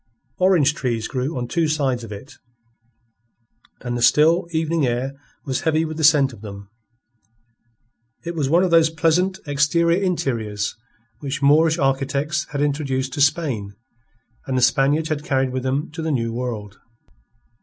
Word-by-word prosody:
Orange 180 -6 +4
trees 120 -6 -2
grew 130 +3 -3
on 120 -1 -3
two 165 +4 0
sides 135 -6 0
of 115 - -9
it, 105 +7 -9 1.5
and 120 -1 -4
the 120 - -3
still, 155 +8 +4
evening 160 -1 0
air 125 +2 -1 0.3
was 130 -2 -2
heavy 160 0 +1
with 155 0 -6
the 160 - -3
scent 145 -4 +5
of 105 - -14
them. 100 -1 -10 1.5
It 170 - -3
was 150 -5 -1
one 170 +4 +4
of 185 - 0
those 165 -1 +5
pleasant 170 +4 +1
exterior 170 +5 +2
interiors 115 - -2 0.4
which 140 0 -4
Moorish 160 +3 +4
architects 140 +2 0
had 145 -1 -4
introduced 135 -3 -1
to 145 - -2
Spain 135 - 0 0.7
and 130 -1 -1
the 125 - +2
Spaniards 145 +4 +2
had 150 -1 -2
carried 135 -3 0
with 130 0 -3
them 135 +5 -2
to 160 +1 -6
the 160 - -2
New 115 -4 -1
World. 115 -4 -5
140 Hz, 155 wpm, -21 LUFS, 125-160 Hz, 1.5 s, scent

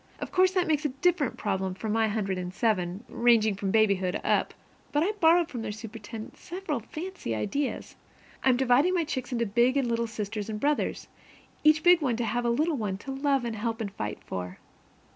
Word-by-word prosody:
Of - - -5
course 370 0 +4
that 365 -2 +2
makes 305 -2 +1
a - - +2
very 265 - -13
different 350 -7 +2
problem 190 -3 -2
from 215 +2 -4
my 225 0 +2
hundred 200 -3 -1
and 180 0 -4
seven, 190 -2 0
ranging 230 -3 +3
from 195 0 -3
babyhood 200 -3 +2
up. - - +1 0.4
But 295 +1 +2
I 390 - +1
borrowed 335 -1 +5
from 245 -4 -5
their 215 - -3
superintendent 220 0 -8
several 350 -6 -4
very 310 - -6
fancy 365 - -4
ideas. 265 - -3 0.5
I'm 255 -2 +4
dividing 265 +8 +3
my 345 - +2
chicks 265 -5 -4
into 235 -1 0
big 240 +6 +2
and 270 -3 +1
little 235 0 0
sisters 210 -1 -4
and 210 -1 -3
brothers, 295 +3 0 0.6
each 310 0 +5
big 355 -1 +6
one 255 -5 +1
to 240 - -1
have 240 +2 -1
a - - +2
little 300 +6 +1
one 205 -5 -2
to 270 +7 -7
love 270 -1 +1
and 230 -1 -3
help 225 +1 -2
and 210 -3 -3
fight 105 - -4
for. 90 0 -5
235 Hz, 210 wpm, -28 LUFS, 210-295 Hz, 0.6 s, big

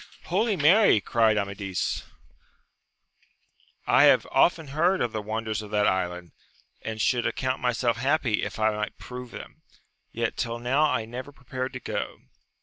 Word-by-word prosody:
Holy 205 +4 +1
Mary! 170 - +5
cried 110 +1 +2
Amadis, 100 -2 -2 1.8
I - - +5
have - - +5
often 165 -4 +3
heard 170 +7 +2
of 120 - 0
the 110 - -3
wonders 110 0 -3
of 105 - -9
that 105 0 +1
island, 90 -3 -1 0.5
and 110 0 -5
should 120 +2 +1
account 130 0 -2
myself 120 -2 0
happy 130 -3 +1
if - - -4
I 110 0 +2
might 105 0 -4
prove 125 0 -8
them, - - -11 0.5
yet - - -2
tiU 115 0 -2
now 130 +6 +2
I 115 -5 -1
never 125 +5 -7
prepared 130 -1 -5
to - - -5
go - - -4
120 Hz, 150 wpm, -26 LUFS, 110-135 Hz, 1.8 s, Mary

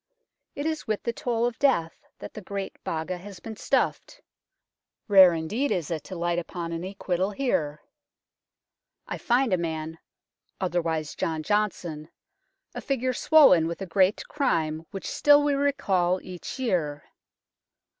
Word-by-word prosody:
It 285 - -4
is 315 -1 -2
with 215 -1 -2
the 235 - -1
toll 240 -5 -1
of 240 -1 -3
death 170 -13 +2 0.2
that - - -9
the 215 - -8
Great 195 0 -6
Baga 165 +3 -3
has 195 +1 -10
been 225 -1 -8
stuffed. - - -1 0.9
Rare 190 -4 +8
indeed 215 - -1
is 170 -3 -1
it 155 -3 -3
to 190 - -7
light 175 0 0
upon 170 0 -5
an 165 +1 -4
acquittal 190 -1 -2
here. 165 - -1 1.2
I - - -5
find 245 -2 +2
a - - +4
man 160 -1 -4 0.3
" - - -51
otherwise 165 -4 -1
John 160 -1 -2
Johnston," 175 -6 -1 0.6
a - - -6
figure 255 -2 -1
swollen 250 - +6
with 170 - -5
a 195 - -4
great 190 +3 +2
crime 160 - -1
which 195 - -7
still 290 0 +5
we 290 -1 +2
recall 195 -11 +1
each 180 +6 -7
year. 170 - -1
185 Hz, 150 wpm, -26 LUFS, 165-235 Hz, 1.2 s, Rare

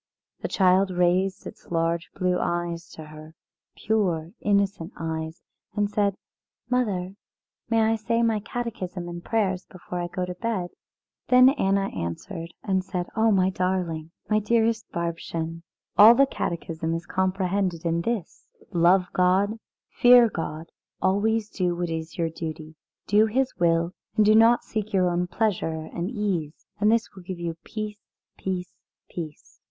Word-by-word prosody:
The - - -3
child 190 0 +3
raised 180 +1 +1
its - - -10
large 165 0 0
blue 180 -1 +1
eyes 175 -1 -2
to 160 - -9
her, 155 +1 -12 0.4
pure 180 -7 0
innocent 200 -3 0
eyes, 160 0 -4 0.3
and 205 0 0
said: 200 -2 +1 0.6
"Mother, 195 -7 0 0.6
may 225 -1 +3
I 220 +1 +2
say 230 +2 0
my 225 -2 +2
Catechism 200 -6 -5
and 175 0 -7
prayers 190 -5 0
before 180 -1 -7
I 175 - -2
go 180 +1 -3
to 180 - -5
bed?" 185 -2 -3 0.6
Then 255 0 +7
Anna 195 -7 +1
answered 165 - -5
and 190 -2 0
said: 180 -2 -4
"Oh, 225 0 +3
my 190 -2 +3
darling! 180 -4 -1 0.2
My 215 0 +3
dearest 225 +1 +1
Bärbchen! 165 -1 -3 0.4
All 220 +3 +10
the 275 +2 +6
Catechism 165 -7 -3
is 165 - -5
comprehended 190 -2 -1
in 170 0 +1
this: 225 -1 -4 0.3
Love 180 +2 +4
God, 190 +4 +2 0.3
fear 245 -1 +7
God, 165 -3 -5 0.3
always 210 +3 +1
do 180 -4 -1
what 175 -1 -2
is 160 0 -5
your 165 -2 0
duty. 155 -1 -6 0.3
Do 210 +2 +4
His 260 +4 0
will, 170 0 +2 0.2
and 215 -1 +4
do 215 - +6
not 225 +2 +6
seek 215 -2 -3
only 215 - -20
your 185 -2 +3
own 175 +1 0
pleasure 175 -6 -1
and 175 +2 -2
ease. 190 - -3
And 210 +1 +4
this 230 0 +2
will 190 - -11
give 180 0 -6
you 170 -1 -3
peace 215 -1 -5 0.4
peace 185 -1 -4 0.3
peace." 155 -4 -8
185 Hz, 155 wpm, -25 LUFS, 170-215 Hz, 0.6 s, All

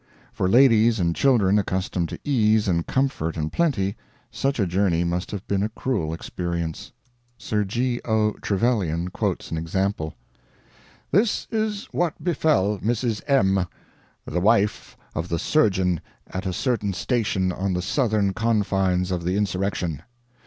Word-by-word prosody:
For 95 - 0
ladies 115 -2 +5
and 85 -2 +1
children 105 -7 +4
accustomed 95 -3 -1
to - - -6
ease 110 -7 +2
and 85 -3 0
comfort 130 -12 -1
and 80 0 -3
plenty, 115 - +1 0.4
such 135 -1 -1
a 100 - +3
journey 90 -1 +1
must 85 +1 -2
have 100 -2 -6
been 100 -1 0
a 105 - 0
cruel 105 -8 -2
experience. 85 0 -4 0.5
Sir 105 -3 -1
G. 120 +5 -1
O. 110 -2 +2
Trevelyan 95 -6 0
quotes - - -2
an 80 - -1
example: 85 -1 -2 1.0
"This 205 - +2
is 215 -2 -1
what 175 -2 -1
befell 150 - +2
Mrs. 115 +1 -1
M, 95 -9 +3 0.6
the 90 +3 -2
wife 105 0 +1 0.2
of 80 +3 -3
the 85 - 0
surgeon 95 - +2 0.3
at 95 +1 -4
a - - 0
certain 105 0 -1
station 95 -1 0
on 95 +1 -2
the 90 - -1
southern 105 -3 +1
confines 95 -5 +1
of 90 -2 -2
the 90 +3 0
insurrection. 95 -5 -1
100 Hz, 145 wpm, -24 LUFS, 90-115 Hz, 1.0 s, ladies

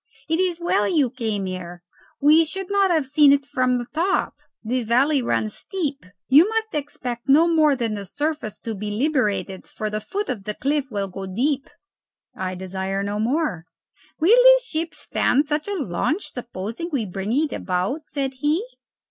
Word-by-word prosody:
It 325 +1 0
is 360 -2 0
well 275 -12 +1
you 275 -2 +2
came 220 -6 -2
here. 180 -1 -6 0.4
We 305 +3 +6
should 380 +5 -5
not 400 -1 +3
have 320 -5 +2
seen 285 +1 +5
it 280 -1 +3
from 255 -3 +1
the 240 - -4
top. 355 +5 0 0.3
This 245 +3 -1
valley 265 +5 +3
runs 220 -3 -1
steep. 295 - -4 0.2
You 305 +9 +6
must 445 0 -2
expect 260 -4 -5
no 310 +5 +6
more 310 -4 +4
than 230 -4 -1
the 200 -2 -5
surface 295 - -3
to 225 - -4
be 210 +1 -5
liberated, 210 -5 -1
for 215 -1 -4
the 215 0 -2
foot 405 - -3
of 220 -7 -4
the 210 - -3
cliff 285 +1 0
will 200 -3 -2
go 190 +1 -7
deep." 270 +8 -1 0.7
"I 185 0 -3
desire 190 +1 -3
no 205 +1 -3
more." 235 - 0 0.5
"Will 380 +10 +5
the - - +7
ship 330 -6 -3
stand 285 +4 +1
such 300 +2 -1
a 405 - -2
launch, 300 - -2
supposing 235 - -5
we 260 -7 0
bring 195 +2 -4
it 295 +4 +1
about?" 195 - -2
said 270 -2 -2
he. 300 - +1
270 Hz, 180 wpm, -23 LUFS, 210-315 Hz, 0.7 s, the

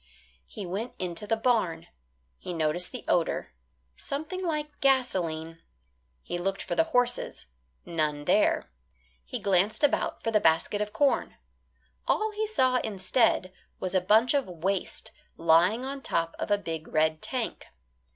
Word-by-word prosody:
He 205 - -7
went 200 +7 -4
into 180 +3 -4
the 225 - +1
barn. 220 -8 +1 0.5
He 180 - -5
noticed 165 +2 +1
the 250 - -7
odour; 170 -2 +1 0.5
something 315 - -5
like 300 -3 -3
gasoline. 170 -12 +1 0.6
He 175 - -4
looked 195 +2 -2
for - - -3
the 325 - +3
horses; 245 -5 0 0.4
none 150 -3 -1
there. - - +2 0.5
He 65 - -5
glanced 195 +6 +1
about 290 - +1
for 225 - 0
the 215 - +4
basket 165 +5 +2
of 210 0 -2
corn. 280 +2 +1 0.7
All 435 0 +1
he 430 +1 -2
saw, 260 -12 +3
instead, 200 -3 +1 0.3
was 185 0 -3
a 185 - +3
bunch 220 +7 +4
of 280 -5 +1
waste 180 +2 -3 0.3
lying 175 +9 +4
on 275 +1 -5
top 165 -9 -1
of - - -3
a 205 - +4
big 165 -5 -5
red 155 0 +1
tank. 255 -4 -3
205 Hz, 145 wpm, -28 LUFS, 170-255 Hz, 0.7 s, the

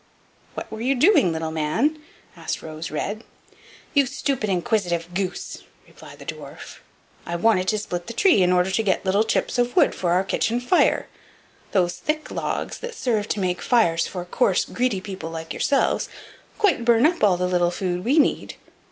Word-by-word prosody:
"What - - -6
were 220 0 -6
you 265 +3 +1
doing, 265 - +4
little 160 0 -3
man?" 190 - 0 0.4
asked - - -5
Rose 160 +1 -6
red. 205 +8 -4 0.7
"You 280 -3 +4
stupid, 270 -5 -2
inquisitive 175 -3 -1
goose!" 185 0 -3 0.3
replied - - -14
the - - -12
dwarf; - - -9 0.4
"I 170 - -4
wanted 185 0 +2
to 215 - +2
split 180 -4 -5
the 235 - -5
tree, 290 - +4
in 180 0 +3
order 180 +1 +2
to 205 - +1
get 200 -2 0
little 195 +3 +3
chips 225 +2 -1
of 245 0 0
wood - - +4
for 175 -2 -1
our 185 +2 +3
kitchen 225 +4 0
fire; 245 +9 +2 0.6
those 175 -3 +1
thick 305 0 -3
logs - - -3
that 485 -1 -7
serve 225 - -1
to 205 - -1
make 180 -2 -1
fires 170 -9 +2
for 180 -2 -6
coarse, 180 +1 +1
greedy 245 -6 -1
people 190 -4 -6
like 160 -1 -6
yourselves 275 -1 +1 0.5
quite 395 - +2
burn 235 +1 +4
up 340 -3 +1
all 190 -4 +5
the 180 - 0
little 175 -1 +2
food 180 0 -3
we 270 +8 +2
need. 300 - +1
200 Hz, 180 wpm, -23 LUFS, 175-245 Hz, 0.7 s, all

